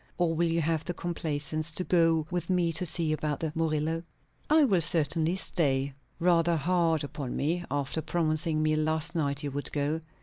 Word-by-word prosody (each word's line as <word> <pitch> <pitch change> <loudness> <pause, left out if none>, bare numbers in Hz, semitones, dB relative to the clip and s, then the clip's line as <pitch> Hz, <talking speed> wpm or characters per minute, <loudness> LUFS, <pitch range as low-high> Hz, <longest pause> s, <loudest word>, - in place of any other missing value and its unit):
or 175 -2 +1
will 170 +1 +1
you 165 0 +1
have 160 0 0
the 175 - -4
complaisance 155 -2 -2
to 170 +3 -2
go 165 -3 +3
with 175 -1 -3
me 175 -2 +2
to 180 +3 +1
see 160 -1 0
about 150 -2 -2
the 160 -2 -2
Murillo?" 160 0 0 0.5
"I 310 0 +5
will 195 -10 +3
certainly 160 +1 +2
stay." 140 -7 0 0.3
"Rather 170 -1 +3
hard 165 -1 +1
upon 140 -2 -5
me, 170 +5 0
after 145 +3 -2
promising 155 -1 0
me 155 0 +2
last 155 +2 0
night 145 -3 -1
you 145 - -3
would 145 +1 -4
go." 150 +2 -1
160 Hz, 180 wpm, -28 LUFS, 150-170 Hz, 0.5 s, I